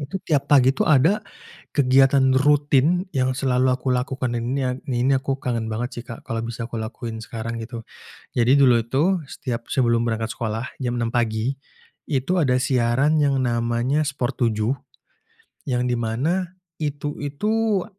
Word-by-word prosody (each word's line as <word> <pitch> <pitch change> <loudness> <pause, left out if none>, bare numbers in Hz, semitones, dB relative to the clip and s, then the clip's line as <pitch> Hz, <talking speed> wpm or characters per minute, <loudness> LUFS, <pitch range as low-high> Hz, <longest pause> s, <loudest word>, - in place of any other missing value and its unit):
Itu 145 +6 -4
tiap 145 -3 +1
pagi 135 -2 +6
ada 160 +8 +4 0.6
kegiatan 135 0 +4
rutin 145 +4 +3
yang 130 0 +1
selalu 130 -1 +1
aku 130 +1 -5
lakukan, 130 0 -2
dan 115 - -2
ini 135 +2 -1 0.4
ini 135 - +3
aku 135 0 -1
kangen 115 -4 -2
banget 120 +4 -3
sih, 120 - -12
Kak. 115 - -9
Kalau 115 0 -2
bisa 115 0 -5
aku 115 - -6
lakukan 110 0 -6
sekarang 115 +1 -5
gitu. 115 0 -7 0.5
Jadi 120 +2 +4
dulu 125 -4 +5
itu, 160 +10 +1
setiap 120 -4 -5
sebelum 120 -4 +2
berangkat 115 -1 -2
sekolah 115 +2 -4
jam 120 -1 -1
6.00 115 - 0
pagi, 115 +2 0 0.6
itu 135 +7 0
ada 130 -7 +2
siaran 130 +4 +2
yang 140 -2 +2
namanya 120 +3 0
Sport 140 -3 -2 0.2
7, 110 +5 0 0.9
yang 125 -1 0
di 125 0 0
mana 160 +11 -1 0.2
itu 145 0 -3
itu, 210 +7 0
130 Hz, 155 wpm, -23 LUFS, 120-140 Hz, 0.9 s, pagi